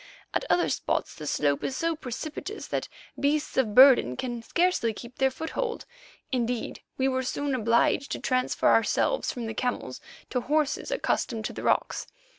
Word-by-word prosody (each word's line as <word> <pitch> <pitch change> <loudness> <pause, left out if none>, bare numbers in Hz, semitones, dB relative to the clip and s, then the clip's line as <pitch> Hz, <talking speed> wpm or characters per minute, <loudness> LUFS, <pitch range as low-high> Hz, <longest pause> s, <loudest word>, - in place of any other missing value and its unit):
At - - 0
other 350 - +3
spots - - -1
the 150 - -8
slope 145 -1 +1
is 265 - -2
so 330 0 0
precipitous 310 - -6
that - - -2 0.3
beasts 295 +2 0
of 220 -6 +1
burden 255 - +7
can 240 -2 -3
scarcely 340 -5 +1
keep 240 +3 -11
their 265 0 +4
foothold; 390 - -4 0.5
indeed, 245 -2 -2 0.2
we 265 - +2
were 260 -1 +1
soon 280 +2 -2
obliged 235 +3 +2
to - - -4
transfer 255 -1 +1
ourselves - - +2
from 240 -2 -5
the 225 - -4
camels 245 +3 -3 0.3
to 250 - 0
horses 300 - 0
accustomed 240 - -1
to - - -3
the - - -6
rocks. - - 0
260 Hz, 165 wpm, -27 LUFS, 235-305 Hz, 0.5 s, burden